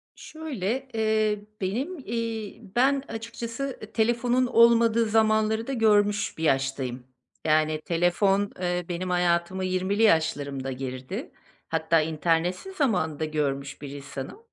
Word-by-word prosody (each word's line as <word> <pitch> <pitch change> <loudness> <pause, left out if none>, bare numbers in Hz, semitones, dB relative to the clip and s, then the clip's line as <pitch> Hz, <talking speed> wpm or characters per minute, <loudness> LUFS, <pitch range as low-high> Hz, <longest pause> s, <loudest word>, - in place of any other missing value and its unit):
Şöyle, 265 -5 -4
eee, 215 -2 +1 0.2
benim, 255 - -2
iii, 230 -4 -4
ben 270 +2 +3
açıkçası, 230 +4 -5
eee, 215 - -9
telefonun 240 +3 +2
olmadığı 230 -1 +5
zamanları 220 0 +2
da 275 - -2
görmüş 210 -3 +2
bir 160 - -5
yaştayım. 135 -3 0 0.4
Yani, 155 0 +2
telefon, 195 +4 +2
eee, 180 -1 -1
benim 180 +1 -3
hayatıma 180 +1 +1
20’li 185 +3 0
yaşlarımda 140 -8 +1
girdi. 130 0 -5 0.4
Hatta 160 0 +2
internetsiz 165 - -1
zamanı 180 - 0
da 160 - 0
görmüş 140 -3 -2
bir 145 - -6
insanım. 140 - -7
195 Hz, 120 wpm, -26 LUFS, 160-230 Hz, 0.4 s, olmadığı